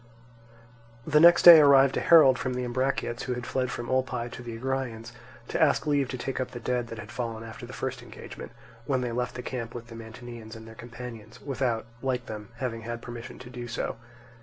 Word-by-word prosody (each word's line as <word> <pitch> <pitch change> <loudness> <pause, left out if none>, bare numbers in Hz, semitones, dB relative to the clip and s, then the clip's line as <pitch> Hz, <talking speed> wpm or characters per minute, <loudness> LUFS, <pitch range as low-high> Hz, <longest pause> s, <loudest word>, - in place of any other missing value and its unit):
The 150 -1 +4
next 170 +2 +7
day 170 -2 +12
arrived 140 -2 +6
a - - +1
herald 145 -7 +6
from 130 -1 -2
the 125 - -2
Ambraciots 125 -1 -2
who 125 - -2
had 120 -1 -6
fled 130 0 -1
from 120 -1 -5
Olpae 125 -2 -1
to - - -8
the 120 -2 -7
Agraeans, 125 -3 -3 0.4
to - - -1
ask 160 0 +3
leave 145 -3 +1
to 130 - -4
take 135 +2 -4
up 130 - -2
the 120 - -8
dead 120 0 -1
that 115 - -8
had 105 0 -9
fallen 115 -2 -4
after 115 0 -9
the - - -10
first - - -4
engagement, - - -10 0.4
when 130 -3 +1
they 125 -1 -2
left 125 +1 -2
the 125 - -6
camp 115 -3 -5
with 115 -1 -8
the 115 - -9
Mantineans 115 0 -10
and 110 0 -11
their 110 - -11
companions, 115 -1 -10
without, 130 -5 -2 0.2
like 125 -2 -1
them, 105 -1 -8
having 115 -2 -3
had 120 +1 -6
permission 120 -1 -8
to 125 -1 -11
do 120 -1 -7
so. - - -3
125 Hz, 215 wpm, -27 LUFS, 115-130 Hz, 0.4 s, day